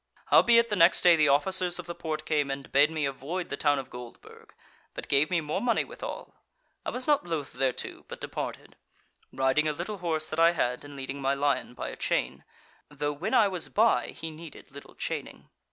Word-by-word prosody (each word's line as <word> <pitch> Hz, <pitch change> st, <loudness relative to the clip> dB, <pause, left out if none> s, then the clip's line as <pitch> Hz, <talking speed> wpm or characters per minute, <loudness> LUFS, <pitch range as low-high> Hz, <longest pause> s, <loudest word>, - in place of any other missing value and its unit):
"Howbeit 235 Hz, 0 st, +6 dB
the 210 Hz, -, 0 dB
next 170 Hz, -1 st, +5 dB
day 175 Hz, -1 st, +7 dB
the 155 Hz, -2 st, +3 dB
officers 180 Hz, +5 st, +2 dB
of -, -, -7 dB
the 170 Hz, -, -5 dB
Porte 160 Hz, -3 st, -5 dB
came 145 Hz, -3 st, 0 dB
and 135 Hz, 0 st, -5 dB
bade 145 Hz, +3 st, +5 dB
me 155 Hz, -2 st, -2 dB
avoid 140 Hz, +7 st, -4 dB
the -, -, -2 dB
town 145 Hz, 0 st, +2 dB
of 135 Hz, -, -6 dB
Goldburg, 125 Hz, -1 st, -12 dB, 0.4 s
but -, -, -6 dB
gave 140 Hz, +2 st, +3 dB
me 175 Hz, -3 st, +1 dB
more 155 Hz, +5 st, -3 dB
money 240 Hz, -1 st, +2 dB
withal. -, -, -8 dB, 0.5 s
I -, -, -3 dB
was 255 Hz, -, -5 dB
not 295 Hz, -2 st, +3 dB
loth 155 Hz, -5 st, -3 dB
thereto, 130 Hz, -2 st, -2 dB
but -, -, -8 dB
departed, -, -, -6 dB, 0.5 s
riding 135 Hz, +4 st, +1 dB
a 150 Hz, -, 0 dB
little 185 Hz, +6 st, -5 dB
horse 160 Hz, -3 st, -1 dB
that 155 Hz, -, -3 dB
I 165 Hz, +1 st, +6 dB
had, 125 Hz, -6 st, -1 dB
and 145 Hz, 0 st, -11 dB
leading 135 Hz, +1 st, -6 dB
my 135 Hz, +1 st, +1 dB
lion 140 Hz, -3 st, -1 dB
by -, -, -5 dB
a -, -, -7 dB
chain, -, -, -1 dB, 0.5 s
though 145 Hz, 0 st, -3 dB
when 170 Hz, -, -2 dB
I 220 Hz, -4 st, +6 dB
was 185 Hz, -4 st, -2 dB
by 225 Hz, +2 st, +3 dB
he 160 Hz, -, -7 dB
needed 155 Hz, -2 st, -12 dB
little 140 Hz, +1 st, -13 dB
chaining. -, -, -5 dB
155 Hz, 205 wpm, -28 LUFS, 140-175 Hz, 0.5 s, day